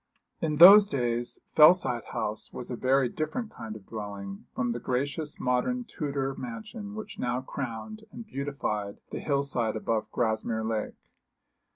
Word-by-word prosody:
In 155 -2 0
those 200 +6 +10
days 120 -5 -1
Fellside 150 -7 +6
House 105 +1 -3
was 125 - -6
a - - -2
very 130 +2 +2
different 215 - -4
kind 110 -1 -8
of 105 -3 -11
dwelling 100 -2 -7
from 120 -1 0
the 120 - -3
gracious 140 +5 -2
modern 130 - 0
Tudor 140 - -3
mansion 130 - -7
which 215 -1 -8
now 125 +1 -1
crowned 135 - -6
and 235 0 -9
beautified 135 - -3
the - - -4
hill 140 -2 0
side 120 -5 0
above 110 0 -1
Grasmere 110 -1 -1
Lake. 110 -1 -2
125 Hz, 150 wpm, -28 LUFS, 115-155 Hz, -, those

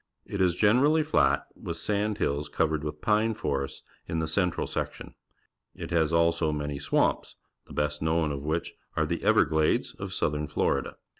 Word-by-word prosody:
It 100 - -3
is 90 -2 +3
generally 135 - +4
flat, 155 - +2
with 85 - -6
sand 105 +3 -1
hills 70 -3 -1
coA'ered 80 -1 0
with 75 0 -5
pine 110 +1 +2
forests 70 -4 -3 0.2
in 80 - -2
the 80 -1 0
central 90 +1 0
section. - - -5 0.6
It - - -7
has 80 -2 +2
also 85 -1 +2
many 75 -1 -3
swamps, - - 0 0.3
the - - -11
best 75 0 -1
known 80 -1 +1
of 70 -1 -4
which 80 +3 -2 0.2
are - - +3
the - - -2
Everglades 80 0 +3
of 95 -1 -7
Southern 75 -4 -1
Florida. 75 - -1
80 Hz, 165 wpm, -28 LUFS, 75-95 Hz, 0.6 s, generally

